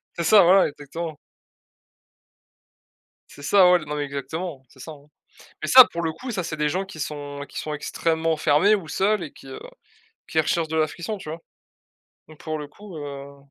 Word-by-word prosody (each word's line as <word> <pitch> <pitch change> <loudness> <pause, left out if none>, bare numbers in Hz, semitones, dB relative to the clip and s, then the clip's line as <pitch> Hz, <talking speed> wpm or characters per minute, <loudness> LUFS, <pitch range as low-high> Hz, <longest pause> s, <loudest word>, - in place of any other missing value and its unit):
C'est 170 - -2
ça, 205 +4 +7
voilà, 185 +3 +5
exactement. 155 +2 -7 2.1
C'est - - -14
ça 185 +5 +5
ouais, 180 0 +5
l 155 - -10
non, 150 - -3
mais 145 -1 -2
exactement, 140 +2 -6
c'est 130 - -21
ça, 160 - -8
hein. 145 -2 -14 0.6
Mais - - -3
ça 255 -1 +10
pour 170 - -3
le 165 -1 -1
coup, 205 +11 -9
ça 190 -5 -2
c'est 160 -2 -5
des 150 0 +1
gens 180 +6 -1
qui 190 -4 -11
sont 145 -1 -5
qui - - -11
sont 155 - -4
extrêmement 160 +2 -1
fermés 155 +7 +3
ou 180 -7 -7
seuls 200 +1 +1
et 150 - -8
qui, - - -16
heu, 135 - -8 0.7
qui 160 - 0
recherchent 160 +1 +1
de 160 - -3
l'affection, 170 +7 -2
tu 170 - -9
vois? 160 +2 -6 0.9
Donc, 155 -1 -15
pour 155 -1 -4
le 150 - -6
coup, 195 +4 -13
heu 140 -1 -8
160 Hz, 200 wpm, -23 LUFS, 145-175 Hz, 2.1 s, ça